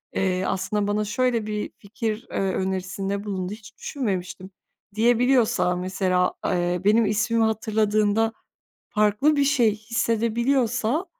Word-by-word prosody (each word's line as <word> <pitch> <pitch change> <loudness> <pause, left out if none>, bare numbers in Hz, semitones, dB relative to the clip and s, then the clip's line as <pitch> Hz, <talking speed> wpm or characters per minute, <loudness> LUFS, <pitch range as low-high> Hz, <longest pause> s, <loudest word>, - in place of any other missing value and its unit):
eee, 185 -1 0
aslında 200 +2 -1
bana 210 +1 0
şöyle 235 0 0
bir 210 0 -3
fikir, 220 +2 -4
eee, - - -3
önerisinde 190 +1 -2
bulundu, 190 -1 -4
hiç 215 -1 -13
düşünmemiştim.” 190 -6 -4 0.4
diyebiliyorsa, 235 -4 +3
mesela. 185 0 0
Eee, 175 0 0
benim 220 +2 +4
ismimi 215 +2 +1
hatırladığında 220 0 +1 0.6
farklı 215 +9 +2
bir 285 - +3
şey 245 -7 +3
hissedebiliyorsa, 235 - 0
215 Hz, 115 wpm, -24 LUFS, 195-230 Hz, 0.6 s, benim